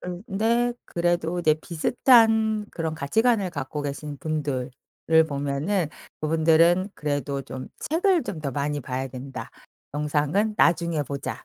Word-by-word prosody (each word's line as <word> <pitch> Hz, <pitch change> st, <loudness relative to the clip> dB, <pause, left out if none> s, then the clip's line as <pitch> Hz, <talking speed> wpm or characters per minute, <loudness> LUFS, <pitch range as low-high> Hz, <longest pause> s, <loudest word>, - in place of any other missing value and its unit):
근데 220 Hz, +6 st, 0 dB
그래도 175 Hz, 0 st, 0 dB
이제 155 Hz, -2 st, +4 dB
비슷한 220 Hz, -, +3 dB
그런 160 Hz, -2 st, -3 dB
가치관을 205 Hz, +6 st, +1 dB
갖고 145 Hz, -2 st, -4 dB
계신 145 Hz, +1 st, -5 dB
분들을 145 Hz, -5 st, -2 dB, 0.6 s
보면은 145 Hz, +5 st, -1 dB, 0.3 s
그분들은 165 Hz, +4 st, +3 dB
그래도 145 Hz, -2 st, -2 dB
좀 130 Hz, 0 st, -8 dB, 0.2 s
'책을 355 Hz, +1 st, +3 dB
좀 160 Hz, -, -5 dB
더 140 Hz, -, -3 dB
많이 145 Hz, +2 st, -2 dB
봐야 130 Hz, +1 st, -4 dB
된다. 130 Hz, +1 st, -8 dB, 0.4 s
영상은 150 Hz, +8 st, 0 dB
나중에 170 Hz, -4 st, +2 dB
보자.' 140 Hz, 0 st, -5 dB
160 Hz, 275 characters per minute, -25 LUFS, 145-195 Hz, 0.6 s, 이제